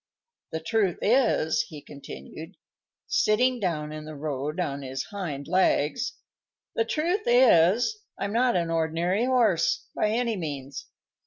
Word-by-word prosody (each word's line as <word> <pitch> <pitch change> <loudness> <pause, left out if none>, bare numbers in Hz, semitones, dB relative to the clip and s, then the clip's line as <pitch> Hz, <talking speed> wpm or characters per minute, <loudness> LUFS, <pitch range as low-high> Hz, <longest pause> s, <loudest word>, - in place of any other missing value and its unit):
The 160 - -2
truth 195 0 +1
is," 230 -9 +3
he 155 - -8
continued, 145 +3 -10 0.5
sitting 250 +4 +2
down 155 -6 -2
in 155 0 -7
the 155 0 -8
road 145 +2 -4
on 140 -5 -2
his 135 0 -4
hind 155 -9 -5
legs, 185 - +1 0.6
"the 225 - +1
truth 345 - -1
is, 240 - +4 0.2
I'm 200 +1 -3
not 245 +1 +2
an 170 -2 0
ordinary 165 +6 0
horse, 230 -10 +2
by 210 - +1
any 230 +1 0
means. 140 -5 -6
180 Hz, 135 wpm, -26 LUFS, 155-230 Hz, 0.6 s, is